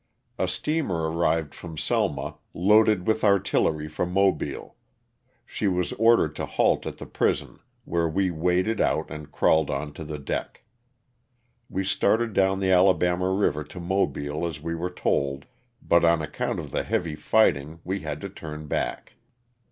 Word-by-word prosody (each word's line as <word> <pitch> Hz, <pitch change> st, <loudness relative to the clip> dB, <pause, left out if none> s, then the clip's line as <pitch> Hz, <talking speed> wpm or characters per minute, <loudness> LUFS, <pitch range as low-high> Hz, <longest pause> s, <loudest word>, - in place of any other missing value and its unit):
A -, -, +1 dB
steamer 95 Hz, -, -1 dB
arrived 80 Hz, -3 st, 0 dB
from 80 Hz, -3 st, -9 dB
Selma, -, -, -1 dB, 0.2 s
loaded 105 Hz, +1 st, +4 dB
with 110 Hz, 0 st, +1 dB
artillery 95 Hz, -6 st, +2 dB
for 75 Hz, +2 st, -3 dB
Mobile; 90 Hz, -6 st, 0 dB, 0.7 s
she 105 Hz, -, -2 dB
was 90 Hz, -2 st, 0 dB
ordered 115 Hz, -9 st, +3 dB
to -, -, -3 dB
halt -, -, +1 dB
at -, -, -6 dB
the -, -, -8 dB
prison, -, -, -1 dB, 0.3 s
where 85 Hz, -1 st, 0 dB
we 95 Hz, +2 st, +1 dB
waded 90 Hz, +6 st, +1 dB
out -, -, 0 dB
and 75 Hz, -1 st, -8 dB
crawled 80 Hz, 0 st, +3 dB
on 70 Hz, +1 st, -3 dB
to 80 Hz, -, -8 dB
the 75 Hz, 0 st, -5 dB
deck. 70 Hz, -, -5 dB, 1.1 s
We 95 Hz, -, -2 dB
started 105 Hz, +4 st, +1 dB
down 95 Hz, 0 st, +2 dB
the 95 Hz, -1 st, +2 dB
Alabama 90 Hz, 0 st, +3 dB
river 95 Hz, -6 st, +1 dB
to 80 Hz, +5 st, -10 dB
Mobile 85 Hz, -4 st, -1 dB
as 80 Hz, -3 st, -6 dB
we 85 Hz, +2 st, -4 dB
were 85 Hz, +2 st, -3 dB
told, 70 Hz, -5 st, -1 dB, 0.4 s
but 85 Hz, -, +3 dB
on 85 Hz, -1 st, +4 dB
account 75 Hz, -, -3 dB
of -, -, -7 dB
the -, -, 0 dB
heavy 85 Hz, -3 st, -1 dB
fighting 75 Hz, -3 st, +2 dB
we 95 Hz, +2 st, -2 dB
had 75 Hz, -3 st, -5 dB
to 100 Hz, -, -5 dB
turn 75 Hz, -5 st, -8 dB
back. 60 Hz, -4 st, -3 dB
85 Hz, 160 wpm, -25 LUFS, 75-95 Hz, 1.1 s, loaded